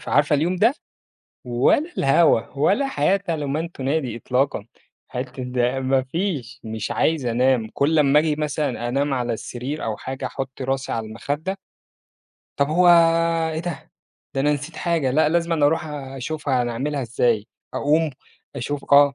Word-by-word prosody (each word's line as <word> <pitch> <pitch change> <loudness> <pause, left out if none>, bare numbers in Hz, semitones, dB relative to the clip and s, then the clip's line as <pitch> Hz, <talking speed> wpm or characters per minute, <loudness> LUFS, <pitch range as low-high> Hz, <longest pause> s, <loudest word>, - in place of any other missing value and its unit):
فعارفة 150 0 +2
اليوم 175 +5 0
ده؟ 230 +8 +4 0.7
ولا 130 - +2
الهوا، 135 -2 +4 0.2
ولا 200 - +3
حياة 195 - +1
لمن 155 +1 -2
تنادي 135 -4 -2
إطلاقًا. 125 -2 -1 0.4
حتة 130 +1 -5
ده 125 +1 0
مفيش، 135 - -1
مش 110 -1 -4
عايز 155 -5 +1
أنام 120 -1 +2
كُل 155 +3 +2
أمّا 145 0 +5
آجي 155 -1 +1
مثلًا 145 -5 -2
أنام 140 +3 0
على 120 -2 -1
السرير 125 +6 -5
أو 110 -1 -2
حاجة 130 0 -5
أحط 135 0 -6
راسي 135 +1 -2
على 110 -1 -2
المخدة 145 - -4 1.0
طَب 140 0 +2
هو 175 +3 +4 0.7
إيه 160 - -2
ده؟ 175 0 -6 0.4
ده 135 - 0
أنا 150 +1 +3
نسيت 150 +3 -5
حاجة، 165 -7 0
لأ، 150 +3 +3
لازمًا 165 -2 +2
أروح 160 +2 +1
أشوفها 140 +1 -4 0.2
أعملها 140 +5 -2
إزاي 115 -3 0 0.3
أقوم، 155 +2 +2 0.5
أشوف 140 +2 -4
آه 140 0 +7
140 Hz, 145 wpm, -22 LUFS, 125-155 Hz, 1.0 s, آه